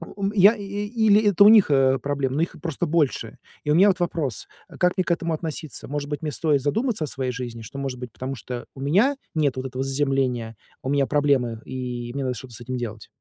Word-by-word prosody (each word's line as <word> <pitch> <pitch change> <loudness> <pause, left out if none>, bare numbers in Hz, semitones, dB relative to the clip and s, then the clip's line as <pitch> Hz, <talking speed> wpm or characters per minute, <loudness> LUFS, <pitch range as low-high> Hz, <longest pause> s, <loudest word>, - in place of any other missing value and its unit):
ум 200 0 -1
я, 205 +3 +7
и 205 - -8 0.2
или 215 -2 +3
это 200 0 +5
у - - +9
них, 215 -7 +6
э, 135 -1 +4
проблемы, 140 -1 -2
но - - +2
их 170 - -4
просто 165 0 -2
больше? 150 -4 0 0.3
И 150 - 0
у - - +4
меня 195 +5 +6
вот 185 - +1
вопрос: 160 - -2 0.2
э, - - -13
как 180 +1 +2
мне 185 - +2
к - - -4
этому 170 -1 0
относиться? 155 -4 -5
Может 145 +1 -4
быть, 145 - -4
мне 150 - -2
стоит 150 -3 +1
задуматься 215 - 0
о - - -7
своей 130 -2 -3
жизни? 120 -2 -6
Что, 125 +5 -8
может 135 -2 -3
быть, 125 -2 -7
потому 130 +1 -5
что 120 +1 -7
у 135 - -9
меня 205 - +3 0.2
нет 145 -4 +1
вот 130 - -3
этого 130 +1 -4
заземления, 135 -4 0 0.3
у 130 - -3
меня 140 -1 +2
проблемы, 140 -6 +1
и 125 -2 -5
мне 140 0 -3
надо 125 -1 -1
что-то 125 0 -10
с 105 - -10
этим 130 +2 -4
делать? 110 -3 -6
140 Hz, 240 wpm, -24 LUFS, 130-170 Hz, 0.3 s, у